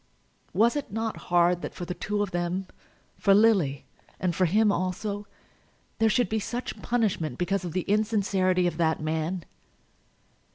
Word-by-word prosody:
Was 225 - +3
it 290 - -3
not 225 +1 -2
hard 175 0 +3
that - - -6
for 175 - -5
the 180 - -3
two 205 +3 -1
of 200 - -4
them, 175 +2 -2 0.5
for 195 -1 +5
Lily 195 -11 +3 0.3
and 180 -2 0
for 185 - +3
him 210 +5 +3
also, 200 +3 -2 0.7
there 225 0 +4
should 245 +2 +2
be 220 - -1
such 240 +4 -5
punishment 200 - 0
because 190 +1 0
of 175 -3 -5
the 185 - 0
insincerity 195 -3 +1
of 170 -3 -1
that 160 -2 +1
man? 160 +3 -2
190 Hz, 160 wpm, -27 LUFS, 175-215 Hz, 0.7 s, for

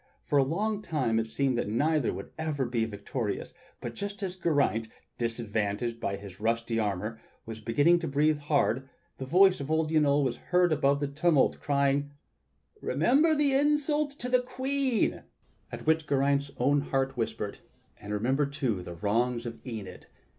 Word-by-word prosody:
For 145 - +2
a - - +5
long 205 +9 -1
time 130 - 0
it 110 - -2
seemed 130 +1 0
that 105 - -2
neither 145 +4 +1
would 100 - -7
ever 155 -4 -2
be 120 -2 0
victorious, 105 +1 -4 0.3
but 120 - -6
just 200 - -5
as 185 -1 -3
Geraint, 145 -10 +1 0.3
disadvantaged 115 -1 -2
by 100 - -2
his 100 -2 -11
rusty 115 +1 0
armor, 105 +2 -2 0.2
was 115 -1 -7
beginning 145 +11 +3
to 165 - -4
breathe.hard, 145 -3 +1 0.3
the 130 - -4
voice 185 +6 +5
of 140 +1 -5
old 160 0 +1
Yniol 145 -2 +3
was 130 -3 -1
heard 180 -2 +2
above 140 -1 +2
the 145 - 0
tumult, 150 +1 +2
crying: 140 0 +1 0.7
"Remember 310 +5 +3
the 290 -2 +2
insult 295 +1 +2
to 250 - -3
the 250 0 +3
Queen!" 260 0 0 0.5
At - - -7
which 160 0 +2
Geraint's 140 0 +1
own 140 +3 +3
heart 135 -1 -1
whispered, 110 -3 -3 0.4
"And 105 - -8
remember, 130 +7 +1
too, 130 -9 -2
the 90 -1 -8
wrongs 120 +5 0
of 115 -1 -6
Enid!" 110 -7 -8
140 Hz, 160 wpm, -29 LUFS, 115-160 Hz, 0.7 s, a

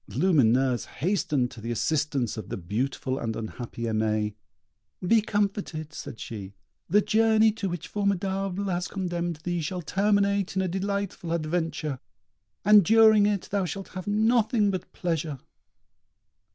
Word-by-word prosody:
Lumineuse 130 -7 +3
hastened 150 -7 0
to 115 - -11
the 115 - -5
assistance 140 -1 0
of 110 -4 -7
the - - -3
beautiful 130 +8 -2
and 115 -1 -3
unhappy 115 +1 -6
Aimée. 110 -2 0 0.7
"Be 225 +4 +5
comforted," 200 -7 -2
said 115 - -8
she; 100 -3 -7 0.3
"the 205 +5 +5
journey 220 +1 +4
to 210 -3 -3
which 175 -2 -5
Formidable 195 -1 -1
has 180 -2 -1
condemned 175 -3 -3
thee 175 -1 -1
shall 175 +3 -4
terminate 200 +1 +1
in 190 - +1
a - - 0
delightful 195 -1 -3
adventure, 160 -3 -2 0.7
and 210 -1 +8
during 220 +1 +6
it 205 -3 -1
thou 200 -1 +1
shalt 195 +2 -5
have 185 0 -7
nothing 220 0 +3
but 185 -2 -5
pleasure." 160 -4 -2
180 Hz, 140 wpm, -27 LUFS, 135-200 Hz, 0.7 s, and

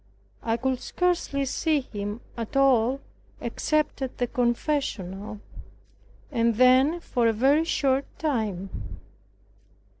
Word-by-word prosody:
I 225 0 0
could 260 +1 -1
scarcely 345 -6 0
see 305 +2 +1
him 205 -2 -5
at 230 +3 -4
all 265 -1 +4 0.4
except 305 -2 -1
at 265 -1 -4
the 245 - +1
confessional, 225 - -2 0.9
and 230 -3 +2
then 260 +7 +5
for 245 -8 0
a 225 - +3
very 275 +8 +3
short 275 -4 +1
time. 215 - -2
255 Hz, 110 wpm, -26 LUFS, 225-280 Hz, 0.9 s, then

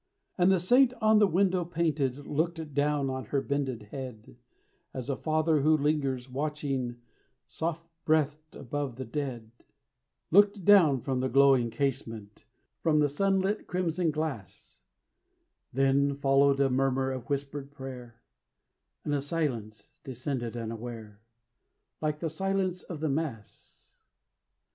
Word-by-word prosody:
And 180 +1 +4
the 190 - +3
saint 245 +8 +4
on 220 -2 +4
the 205 - +5
window 185 0 +2
painted 150 -5 -1
Looked 160 0 -2
down 145 0 +1
on 130 -2 -4
her 140 +6 0
bended 135 -5 -2
head, 125 -6 -8 0.6
As 130 +1 -3
a - - -1
father 155 0 +1
who 155 +2 +4
lingers 140 -4 0
watching 135 -2 -3 0.5
Soft 165 0 -4 0.2
breathed 155 0 0
above 140 -1 -4
the 130 +1 -6
dead 120 -3 -5 0.8
Looked 200 0 +4
down 165 -11 +6
from 130 +1 -1
the 130 +1 0
glowing 135 -2 +5
casement, 115 -4 -4 0.4
From 155 -2 +2
the 150 -1 +3
sun 195 +6 +1
lit 205 +3 -2
crimson 180 -1 0
glass 140 - -5 0.9
Then 135 +2 +2
followed 140 0 +3
a 135 -1 +3
murmur 135 0 +1
of 130 -3 -6
whispered 140 0 -3
prayer, 130 -4 -10 0.8
And 145 - -1
a 145 - +1
silence 130 -8 -4
descended 125 -2 -4
unaware, 115 -2 -7 0.8
Like 150 -1 -2
the 165 - -1
silence 190 +1 -1
of 165 -4 -8
the 160 - 0
mass. 135 -8 -6
140 Hz, 130 wpm, -29 LUFS, 130-160 Hz, 0.9 s, down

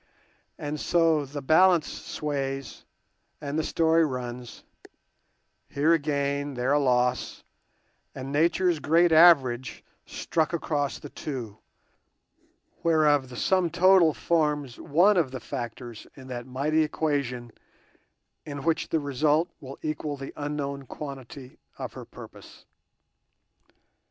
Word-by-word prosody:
And 150 +1 -4
so 165 -4 +2
the 140 +1 -7
balance 170 +2 +5
sways 135 -2 -5 0.5
and 145 0 -4
the - - 0
story 165 +1 +2
runs—here 125 +3 -5
a 165 - +3
gain, 140 -1 -2
there 125 +3 0
a 145 - +4
loss, 125 -2 0 0.7
and 135 +1 -6
Nature's 170 +3 +2
great 170 +3 +3
average 140 -7 +5 0.2
struck 160 0 -1
across 145 -4 -1
the - - -10
two, 120 -8 -6 1.2
whereof 150 -5 +3
the 125 - -9
sum 185 +3 +2
total 180 -1 +5
forms 150 -5 -1
one 180 +7 +3
of 160 -7 +2
the 130 0 -6
factors 120 0 -7
in 130 -2 -12
that 120 -1 -6
mighty 145 +5 0
equation 140 -6 -2 0.9
in 145 -2 -7
which 165 0 0
the 160 - +1
result 150 +4 +1
will 135 0 -10
equal 155 -1 -3
the 135 0 -8
unknown 140 -2 -4
quantity 135 -2 -9 0.2
of - - -6
her - - -9
purpose. - - -13
145 Hz, 115 wpm, -26 LUFS, 130-160 Hz, 1.2 s, balance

